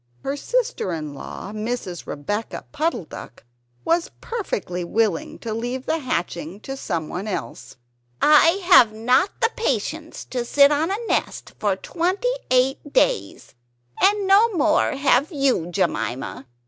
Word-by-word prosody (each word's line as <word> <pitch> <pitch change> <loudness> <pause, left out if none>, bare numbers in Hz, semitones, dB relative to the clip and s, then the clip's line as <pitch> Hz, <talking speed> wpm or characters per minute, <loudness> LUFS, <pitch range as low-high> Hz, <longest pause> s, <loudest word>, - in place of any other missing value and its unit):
Her 275 - -2
sister 480 - -1
in 155 -3 -5
law, 165 +7 -8
Mrs. 215 -5 -4
Rebeccah 205 +10 -4
Puddle 305 - -1
duck, 125 - -11 0.4
was 335 +1 +1
perfectly 200 - -4
willing 205 -1 0
to 225 -2 -5
leave 245 +3 -4
the 325 - 0
hatching 175 - -3
to 270 - -6
someone 180 - -4
else 205 - -5 0.4
"I 330 +5 +5
have 350 - +7
not 250 - +2
the 455 - +3
patience 315 - -2
to 250 -2 -1
sit 280 +4 +5
on 305 +3 +1
a 395 - -1
nest - - -2
for 205 -2 +1
twenty 365 - -1 0.2
eight 260 +3 +1
days; - - 0 0.5
and 405 +1 +4
no 405 +4 +5
more 320 -1 +2
have 275 +1 +2
you, 275 - +1
Jemima. 135 - -2
260 Hz, 135 wpm, -22 LUFS, -, 0.5 s, have